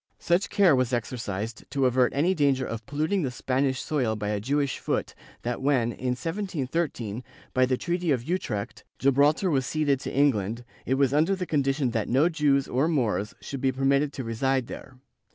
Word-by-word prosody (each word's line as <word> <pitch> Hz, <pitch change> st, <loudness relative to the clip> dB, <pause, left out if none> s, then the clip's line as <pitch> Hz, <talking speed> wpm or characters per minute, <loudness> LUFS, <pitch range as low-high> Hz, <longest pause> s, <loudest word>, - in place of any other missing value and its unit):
^ -, -, -67 dB
Such 175 Hz, +4 st, +1 dB
care 195 Hz, -8 st, +5 dB
was 130 Hz, -1 st, 0 dB
exercised 115 Hz, -2 st, -3 dB
to 135 Hz, 0 st, +1 dB
avert 125 Hz, 0 st, +3 dB
any 165 Hz, +7 st, +3 dB
danger 140 Hz, -5 st, +2 dB
of 115 Hz, 0 st, -5 dB
polluting 155 Hz, +7 st, 0 dB
the 140 Hz, -, -1 dB
Spanish 130 Hz, +2 st, -1 dB
soil 125 Hz, -8 st, 0 dB
by 105 Hz, -1 st, -3 dB
a 105 Hz, -1 st, -1 dB
Jewish 140 Hz, +4 st, -1 dB
foot -, -, -2 dB, 0.3 s
that 120 Hz, 0 st, -3 dB
when, 130 Hz, -4 st, +2 dB
in 125 Hz, +1 st, -2 dB
1713, 165 Hz, -, -3 dB, 0.3 s
by 130 Hz, 0 st, +3 dB
the 130 Hz, 0 st, +1 dB
treaty 175 Hz, +2 st, -2 dB
of 130 Hz, -5 st, +1 dB
Utrecht, 125 Hz, -, -3 dB
Gibraltar 145 Hz, +7 st, +3 dB
was 135 Hz, -3 st, +1 dB
ceded 145 Hz, -3 st, +1 dB
to -, -, -5 dB
England, 120 Hz, -4 st, +1 dB, 0.2 s
it 130 Hz, -, +2 dB
was 135 Hz, -1 st, +2 dB
under 160 Hz, +6 st, +3 dB
the 185 Hz, -1 st, -3 dB
con 150 Hz, -4 st, +1 dB
dition 135 Hz, -2 st, 0 dB
that 115 Hz, -2 st, -2 dB
no 140 Hz, +7 st, +4 dB
Jews 145 Hz, -4 st, +2 dB
or 135 Hz, +5 st, +1 dB
Moors 120 Hz, -9 st, 0 dB
should 135 Hz, -2 st, -6 dB
be 135 Hz, -, +2 dB
permitted 140 Hz, +2 st, +2 dB
to 130 Hz, -, -5 dB
reside 130 Hz, +3 st, 0 dB
there. 135 Hz, +2 st, -9 dB
135 Hz, 190 wpm, -26 LUFS, 125-150 Hz, 0.3 s, care